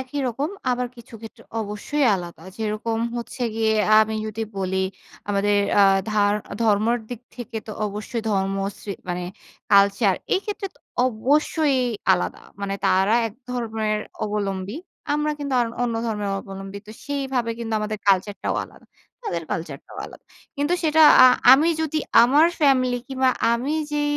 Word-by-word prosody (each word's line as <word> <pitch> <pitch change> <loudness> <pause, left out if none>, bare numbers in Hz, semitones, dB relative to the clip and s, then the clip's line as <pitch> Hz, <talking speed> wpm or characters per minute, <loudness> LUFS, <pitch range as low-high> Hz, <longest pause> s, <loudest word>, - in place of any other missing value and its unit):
একই 260 +2 -5
রকম। 270 +6 -2 0.2
আবার 250 0 0
কিছু 235 0 -14
ক্ষেত্রে 225 -1 -11 0.2
অবশ্যই 215 +8 -2
আলাদা। 175 -3 -7
যেরকম 220 +1 -2 0.2
হচ্ছে 240 +1 -6
গিয়ে 220 -1 +1 0.2
আ - - +8
আমি 220 0 -5
যদি 215 +1 -4
বলি 190 -1 -2 0.5
আমাদের 205 0 +2 0.2
আ - - +8 0.3
ধা 215 -1 +1 0.4
ধর্মর 220 +2 +3
দিক 245 -3 -7 0.2
থেকে 240 -2 -7
তো 215 - -6
অবশ্যই 210 +3 -5
ধর্মশ্রী 195 0 -2 0.2
মানে 180 0 -2 0.5
কালচার 200 0 +5 0.2
এই 380 - +1
ক্ষেত্রে 410 -1 -4
তো 285 - -26 0.3
অবশ্যই 280 +4 +1 0.4
আলাদা। - - -1 0.2
মানে 195 0 -2
তারা 190 +4 +3
একধর্মের 225 -3 -3 0.3
অবলম্বী। 200 +1 -3 0.4
আমরা 300 0 0
কিন্তু 280 -2 -3
আর 235 - +2 0.2
অন্য 235 -2 0
ধর্মের 210 -2 -2
অবলম্বী। 195 0 -8
তো 215 - -10
সেইভাবে 270 -4 -2
কিন্তু 225 -1 -5
আমাদের 215 0 -3
কালচার 195 +1 +3
টাও - - -1
আলাদা। - - -18 0.4
তাদের 170 - -3
কালচার 155 -4 -4
টাও - - -11
আলাদা। - - -15 0.3
কিন্তু 290 +5 +1
সেটা 315 0 +4 0.2
আ - - +10 0.3
আমি 295 +5 +5
যদি 315 0 -1 0.2
আমার 285 +7 +5
ফ্যামিলি 255 -4 +3
কিংবা 260 -1 +2 0.2
আমি 250 +6 -1 0.2
যে 295 0 0
225 Hz, 150 wpm, -23 LUFS, 200-260 Hz, 0.5 s, আ